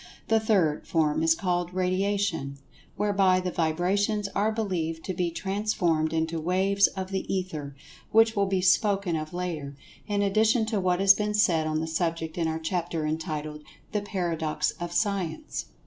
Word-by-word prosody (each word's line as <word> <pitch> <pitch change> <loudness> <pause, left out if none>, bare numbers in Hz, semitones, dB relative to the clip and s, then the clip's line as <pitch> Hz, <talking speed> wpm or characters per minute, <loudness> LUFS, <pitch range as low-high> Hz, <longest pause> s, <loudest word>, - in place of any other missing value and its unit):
The 225 0 +4
third 190 -9 +1
form 155 -2 +1
is 165 0 +4
called 175 -1 -2
"Radiation," 185 -6 0 0.4
whereby 195 -3 +3
the 180 0 -3
vibrations 190 +6 0
are 210 +3 0
believed 175 -7 -2
to 185 - -2
be 175 0 -1
transformed 180 -4 0
into 160 0 -1
"waves 190 +4 +3
of 190 -1 -6
the 190 - -3
Ether," 155 -7 -3 0.4
which 225 +1 +5
will 200 -1 +2
be 190 -1 0
spoken 195 -1 +2
of 155 -1 -4
later, 165 -6 -4 0.3
in 205 -1 0
addition 220 +3 +3
to 220 -2 -1
what 180 -1 +1
has 195 0 +8
been 210 +1 -2
said 165 -7 +3
on 155 0 -1
the - - -2
subject 165 0 -2
in 165 - +1
our 160 0 -1
chapter 165 -1 -2
entitled 155 -1 -3 0.3
"The 210 - -1
Paradox 165 -6 -1
of 175 0 -4
Science." 200 - -2
180 Hz, 165 wpm, -27 LUFS, 160-200 Hz, 0.4 s, has